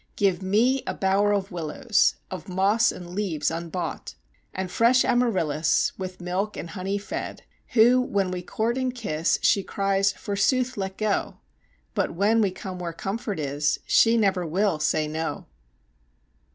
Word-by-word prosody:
Give 195 Hz, -3 st, +1 dB
me 230 Hz, +8 st, +2 dB
a -, -, -2 dB
bower 200 Hz, +2 st, +2 dB
of 200 Hz, 0 st, -1 dB
willows, 180 Hz, -, +1 dB, 0.2 s
of 185 Hz, +1 st, -7 dB
moss 200 Hz, +5 st, +3 dB
and 175 Hz, -1 st, -9 dB
leaves 180 Hz, -7 st, -1 dB
unbought, 170 Hz, +1 st, -5 dB, 0.4 s
And 190 Hz, -1 st, -4 dB
fresh 240 Hz, +5 st, +4 dB
Amaryllis 170 Hz, -11 st, +2 dB
with 185 Hz, -1 st, -6 dB
milk 185 Hz, +4 st, -2 dB
and 165 Hz, -, -6 dB
honey 195 Hz, 0 st, -2 dB
fed, 205 Hz, -, -6 dB, 0.3 s
Who 245 Hz, +2 st, +6 dB
when 200 Hz, -6 st, -1 dB
we 180 Hz, -1 st, -3 dB
court 225 Hz, +7 st, -1 dB
and 255 Hz, -1 st, -1 dB
kiss, 165 Hz, -9 st, 0 dB
she 200 Hz, -, +4 dB
cries: 195 Hz, +1 st, +1 dB
forsooth, 245 Hz, +6 st, 0 dB
let 190 Hz, -1 st, -4 dB
go! 215 Hz, -2 st, -1 dB, 0.6 s
But -, -, -1 dB
when 210 Hz, +5 st, +3 dB
we 200 Hz, -, +3 dB
come 185 Hz, 0 st, -7 dB
where 170 Hz, -2 st, -4 dB
comfort 200 Hz, +2 st, -4 dB
is, 145 Hz, +1 st, 0 dB
she 230 Hz, 0 st, +4 dB
never 195 Hz, -4 st, +2 dB
will 180 Hz, +1 st, 0 dB
say 155 Hz, 0 st, +1 dB
no. 160 Hz, +1 st, -4 dB
195 Hz, 150 wpm, -25 LUFS, 175-215 Hz, 0.6 s, Who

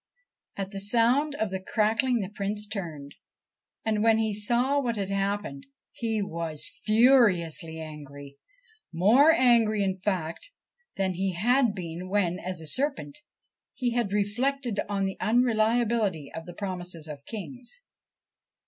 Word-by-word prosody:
At 195 Hz, -1 st, -4 dB
the 195 Hz, -, -5 dB
sound 240 Hz, +8 st, +2 dB
of 220 Hz, -7 st, -2 dB
the 190 Hz, -, -2 dB
crackling 225 Hz, +4 st, +1 dB
the 190 Hz, 0 st, -5 dB
Prince 205 Hz, +1 st, -2 dB
turned, 165 Hz, -9 st, -6 dB, 0.7 s
and, 215 Hz, -1 st, +1 dB
when 225 Hz, 0 st, +4 dB
he 220 Hz, -1 st, 0 dB
saw 240 Hz, +7 st, +2 dB
what 235 Hz, -3 st, -1 dB
had 200 Hz, -2 st, -3 dB
happened, 195 Hz, -, -2 dB, 0.2 s
he 225 Hz, -3 st, -2 dB
was 165 Hz, -5 st, -2 dB
furiously 205 Hz, -9 st, +3 dB
angry, 145 Hz, -3 st, -10 dB, 0.5 s
more 220 Hz, -, +5 dB
angry, 230 Hz, -8 st, +4 dB
in 190 Hz, -1 st, -1 dB
fact, 185 Hz, -, -3 dB, 0.5 s
than 190 Hz, -1 st, 0 dB
he 190 Hz, +1 st, -1 dB
had 240 Hz, +4 st, +2 dB
been 175 Hz, 0 st, -6 dB
when, 185 Hz, -3 st, 0 dB
as 180 Hz, -2 st, -5 dB
a -, -, -9 dB
serpent, 280 Hz, -, -2 dB, 0.6 s
he 245 Hz, -2 st, -1 dB
had 235 Hz, -4 st, 0 dB
reflected 235 Hz, +3 st, -1 dB
on 200 Hz, -1 st, 0 dB
the 190 Hz, -, -4 dB
un 240 Hz, +3 st, +3 dB
reliability 220 Hz, -, +1 dB
of 165 Hz, +1 st, -7 dB
the 175 Hz, -, -9 dB
promises 180 Hz, -5 st, -5 dB
of 145 Hz, -2 st, -8 dB
kings. 245 Hz, -, -8 dB
205 Hz, 140 wpm, -27 LUFS, 180-235 Hz, 0.7 s, more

